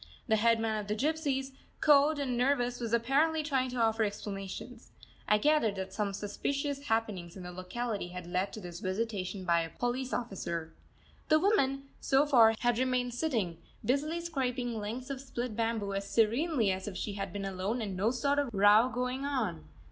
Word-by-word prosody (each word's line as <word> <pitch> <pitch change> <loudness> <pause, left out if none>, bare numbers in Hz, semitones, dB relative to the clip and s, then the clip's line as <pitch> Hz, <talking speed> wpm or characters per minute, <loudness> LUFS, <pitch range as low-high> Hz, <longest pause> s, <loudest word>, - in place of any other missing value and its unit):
The 220 - +4
headman 225 -1 +2
of 205 - -6
the 210 - 0
gypsies, 275 0 -1 0.3
cowed 295 +1 +5
and 270 -3 -1
nervous, 245 -1 +1
was 230 -2 -3
apparently 280 +7 +2
trying 265 -4 0
to 250 - -5
offer 225 -1 +2
explanations. 205 +3 -5 0.4
I 210 - +5
gathered 260 -4 +3
that 190 0 -5
some 205 0 -1
suspicious 280 +8 -3
happenings 205 -6 -1
in 185 - -8
the 180 - -7
locality 195 +3 -4
had 180 0 -7
led 180 +3 -1
to - - -6
this 175 -3 -8
visitation 190 -1 -3
by 170 -1 +3
a 165 - -4
police 250 +6 -2
officer. 170 -8 -3 0.6
The 310 - +6
woman, 275 -8 +2 0.2
so 275 +1 +3
far, 230 -6 +6
had 240 -1 +2
remained 250 -1 +1
sitting, 230 - -1 0.3
busily 300 +6 +1
scraping 255 -7 -2
lengths 235 +6 -5
of 265 -1 -5
split 250 -4 -4
bamboo 225 -3 -1
as 195 0 -3
serenely 230 - +2
as 190 +1 -3
if 195 -3 -5
she 205 - -3
had 195 0 -4
been 200 -1 -4
alone 195 +5 -2
and 205 -4 -3
no 200 +5 +2
sort 280 +3 +1
of 285 -3 0
row 210 +4 +6
going 250 +2 -2
on. 235 - -2
230 Hz, 180 wpm, -31 LUFS, 200-265 Hz, 0.6 s, The